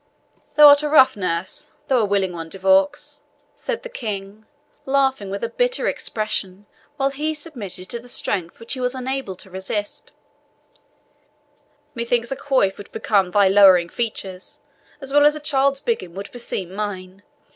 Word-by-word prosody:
"Thou 300 0 +10
art 285 0 +8
a 300 - -2
rough 275 -3 +6
nurse, 185 - -3 0.2
though 260 -2 +3
a 220 - +2
willing 195 -2 0
one, 165 -1 -7
De 195 - -8
Vaux," 195 +11 +1 0.3
said - - -4
the - - -5
King, 215 - -6 0.4
laughing 265 -6 +1
with 200 +2 -5
a - - +1
bitter - - 0
expression, 205 -3 -3 0.3
while 275 -1 +1
he 305 +3 -2
submitted 220 - -7
to 235 - -3
the 245 +1 -14
strength 180 -7 -3
which 230 +1 -5
he 265 - -5
was 250 +1 -1
unable 260 -5 -4
to 185 - -14
resist; 195 +3 -5 1.8
"methinks 235 0 -1
a - - -1
coif 260 -10 +1
would 205 - -11
become 195 -4 +1
thy 200 +1 +4
lowering 190 -3 +6
features 195 -5 -5 0.4
as 270 0 -5
well 290 0 +6
as 295 +1 +5
a - - -5
child's 275 -2 +1
biggin 320 - -3
would 200 +1 -7
beseem 195 -7 -5
mine. 195 -2 -5
220 Hz, 165 wpm, -21 LUFS, 190-275 Hz, 1.8 s, Thou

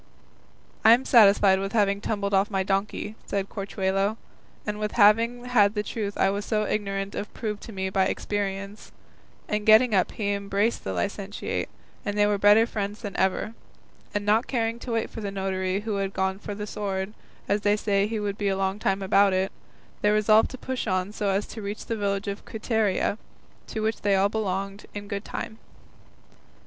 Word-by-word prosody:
"I 225 - +9
am 250 +3 +2
satisfied 200 -4 +6
with 195 0 -4
having 200 -2 +2
tumbled 200 -2 -2
off 195 +3 +3
my 195 -2 0
donkey," 195 +2 -2
said 200 -1 -2
Corchuelo, 195 0 -1 0.5
"and 210 0 -3
with 210 0 -2
having 230 +3 +4
had 210 -4 +3
the 210 - 0
truth 210 -2 -4
I 195 - +3
was 200 +1 -3
so 215 0 0
ignorant 195 -1 -2
of 205 - -5
proved 210 -3 -4
to 230 - -9
me 190 -2 -3
by 190 0 +3
experience;" 200 +1 -3 0.6
and 210 0 -1
getting 220 +2 +6
up 185 -3 +2
he 205 -2 -1
embraced 200 +3 0
the 95 - -3
licentiate, 195 - -3 0.3
and 205 0 -3
they 205 - +5
were 205 -1 +1
better 205 +3 +6
friends 205 -2 -4
than 200 -2 -5
ever; 190 +3 0 0.6
and 205 0 -2
not 215 +3 +3
caring 230 -2 -1
to 240 -1 -5
wait 225 -1 0
for 225 - -7
the 205 - -3
notary 190 0 -2
who 210 -1 -2
had 195 0 -2
gone 190 0 -1
for 205 0 -6
the 210 0 -5
sword, 200 -1 -3 0.3
as 205 +1 +1
they 205 0 +3
saw 200 -1 +1
he 220 0 -3
would 205 -1 -3
be 205 - 0
a 195 -1 +1
long 195 +1 -1
time 195 -1 0
about 195 0 +4
it, 190 +1 0 0.5
they 210 - +3
resolved 215 +1 +4
to 260 - -8
push 255 -1 -4
on 185 0 0
so 210 -1 -2
as 195 +1 +1
to 225 - -8
reach 205 +1 -5
the 230 - -2
village 200 -1 -1
of 200 0 -4
Quiteria, 220 -2 0 0.5
to 220 - -4
which 220 0 -1
they 200 -1 +3
all 195 +1 +3
belonged, 195 -1 -3
in 205 0 -6
good 200 0 -4
time. 220 0 -6
205 Hz, 195 wpm, -26 LUFS, 195-215 Hz, 0.6 s, I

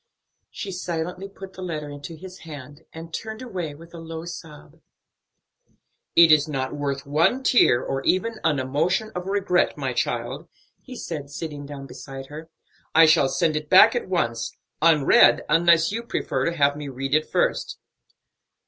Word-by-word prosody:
She 200 - -6
silently 180 +1 -4
put 195 -1 -11
the 185 - -10
letter 155 -5 -4
into 145 +3 -8
his 185 +3 -11
hand, 145 -1 -11
and 165 0 -10
turned 220 +2 -6
away 180 -11 -5
with 165 +3 -15
a 170 - -8
low 165 0 -7
sob. 165 -3 -11 1.3
"It 165 -1 +8
is 150 -1 +5
not 135 -3 -3
worth 140 -1 -3
one 165 - +1
tear, 180 - +4
or 135 - -3
even 220 +4 0
an 160 -3 +2
emotion 165 - 0
of 180 +1 -5
regret, 195 -2 +1
my - - -2
child," - - -3 0.3
he 255 - -11
said, 150 - -6
sitting 145 -1 -7
down 140 -1 -8
beside 135 +1 -9
her. 155 +2 -9 0.5
"I 165 +1 +8
shall 155 -3 +4
send 160 +2 +1
it 150 0 -4
back 215 +5 +7
at 240 - -3
once; 115 -10 -2 0.2
unread, 155 -4 +5
unless 165 +2 +4
you 225 +2 -3
prefer 135 - -2
to 170 0 -2
have 145 -1 +3
me 150 -1 -7
read 135 +1 -4
it 155 +1 +2
first." - - 0
160 Hz, 165 wpm, -24 LUFS, 145-180 Hz, 1.3 s, It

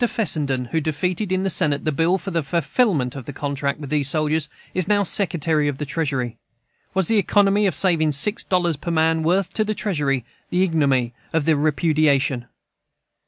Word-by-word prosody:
Fessenden, 150 - 0
who 160 - +1
defeated 180 +6 -2
in 185 0 0
the 195 - 0
Senate 150 -5 +1
the 155 - +1
bill 165 +5 +2
for 195 - -6
the 165 -1 0
fulfillment 155 - 0
of 135 -4 -7
the - - -6
contract 140 +1 -3
with 145 -3 -8
these 145 -2 +1
soldiers, 155 0 0 0.2
is 185 -1 0
now 205 0 +3
Secretary 160 -5 +1
of 145 -2 -2
the 150 - -4
Treasury. 135 -5 -2 0.6
Was 190 -2 +1
the 225 -2 +3
economy 205 +1 +3
of 180 - -1
saving 160 -3 +2
six 205 +10 +1
dollars 175 -4 0
per 170 - -6
man 160 0 +2
worth 180 +4 0
to 215 - +1
the 215 0 -2
Treasury 145 - -1 0.2
the 180 +1 +2
ignominy 140 -8 +1 0.2
of 160 -3 +1
the 160 - +3
repudiation? 145 -4 +1
160 Hz, 185 wpm, -22 LUFS, 140-185 Hz, 0.6 s, now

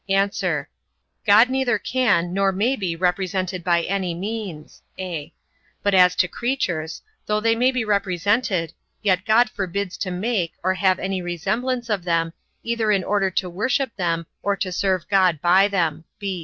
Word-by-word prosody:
A. 195 +1 +1 0.6
God 220 +5 +6
neither 265 -2 +1
can, 205 -9 +1
nor 195 0 +2
may 220 +8 +1
be 185 -8 -3
represented 185 0 -1
by 170 -1 +2
any 185 -2 -2
means: 195 -4 -6 0.2
(a) 175 -6 -5 0.5
but 200 - +2
as 180 -1 +6
to 185 - +2
creatures; 175 -11 -2 0.2
though 210 0 +1
they 225 +1 +2
may 250 +3 +3
be 250 -3 -1
represented, 200 -2 0 0.3
yet 185 -2 +2
God 230 +3 +5
forbids 195 -2 -4
to 190 - -2
make, 185 -1 -1
or 185 +1 +2
have 185 -1 +2
any 190 -1 -2
resemblance 215 +9 -2
of 205 -5 -1
them, 165 -1 0 0.3
either 230 -2 0
in 195 -3 +2
order 195 -1 +1
to 185 0 -1
worship 235 +8 -1
them 170 -3 -1 0.2
or 200 0 0
to 190 -1 -3
serve 185 -1 0
God 185 -6 +3
by 185 +5 +5
them. 165 -5 -1
195 Hz, 160 wpm, -22 LUFS, 175-215 Hz, 0.6 s, God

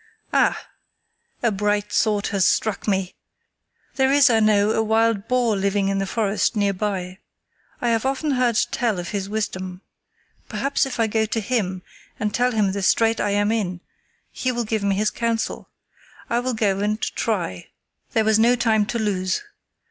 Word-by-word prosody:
Ah! - - +2 0.8
a 235 - +3
bright 205 +1 -1
thought 210 -2 +1
has 195 -4 +2
struck 215 -1 0
me! 190 -3 0 0.8
There 265 0 +3
is, 280 -2 +6
I 225 - +4
know, 210 -1 +3
a 220 - +1
wild 220 -1 +1
boar 245 -3 +2
living 195 0 0
in 195 0 0
the 195 - -2
forest 215 +2 0
near 200 -1 +1
by. 190 -2 -3 0.6
I 240 - +1
have 225 -1 +1
often 275 +3 -1
heard 250 -4 +1
tell 230 -6 0
of 175 -1 -5
his 200 -1 -3
wisdom. 185 -3 -4 0.7
Perhaps 275 0 0
if 250 -2 -6
I 225 - +4
go 220 0 0
to 225 - -1
him 195 -5 -2 0.4
and 210 -2 -1
tell 245 +2 +2
him 210 -4 +1
the 200 +1 -3
strait 225 +4 +2
I - - 0
am 205 +1 +1
in 190 -6 -1 0.5
he 255 - -1
will 240 -1 -2
give 220 0 -1
me 200 -1 +1
his 215 +2 +1
counsel. 230 -1 -2 0.6
I 235 - +2
will 250 0 -2
go 200 -3 +1
and 210 +2 0
try." 180 - -2 0.5
There 220 - +2
was 220 0 +3
no 235 +2 +5
time 220 -3 +2
to 235 - -2
lose. 195 - -1
215 Hz, 180 wpm, -22 LUFS, 200-230 Hz, 0.8 s, is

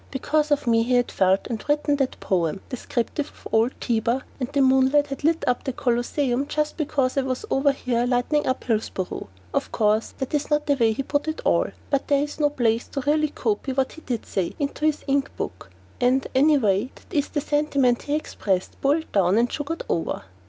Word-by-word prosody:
Because 295 +3 0
of 290 -2 +1
me 230 -1 +4
he 250 +2 +1
had 245 0 +2
felt 190 +1 +2
and 230 -3 -4
written 295 0 +2
that 270 -2 -1
poem 180 0 0
descriptive 255 +3 -2
of - - -12
old 225 +3 +2
Tiber, 235 +2 0 0.2
and 255 0 -3
the 285 - 0
moonlight 265 +2 +4
had 275 0 -7
lit 325 +2 +2
up 250 -1 +1
the 265 - -3
Colosseum 250 +2 0
just 300 0 -1
because 280 -4 0
I - - +4
was 260 +7 -3
over 275 +1 +3
here 245 -3 -1
lighting 255 +4 +1
up 260 0 -1
Hillsboro. 215 - -2 0.3
Of - - -1
course, 215 0 +1
that 265 +1 -4
is 295 -1 0
not 295 0 +1
the 285 - +3
way 230 -5 +2
he 275 - -3
put 290 +3 -1
it 315 - -2
all, - - +3 0.2
but 275 -1 +1
there 285 -1 +3
is 295 +1 -6
no 295 -1 +3
place 235 -4 0
to 275 - -4
really 305 +2 +2
copy 240 0 -2
what 265 0 0
he 320 - -12
did 245 -6 -4
say 185 -3 -1
down - - -16
into 305 - -1
this 305 -1 0
imp 275 0 0
book - - -5 0.3
and, 255 +1 +2
anyway, 255 -6 +3
that - - -18
is 290 -1 +2
the 295 - -1
sentiment 280 -4 +1
he 290 - -1
expressed, 195 -11 -2
boiled 300 +4 +1
down 190 0 +3
and 240 +1 +2
sugared 320 +3 -3
over. 165 - -2
265 Hz, 210 wpm, -24 LUFS, 235-290 Hz, 0.3 s, me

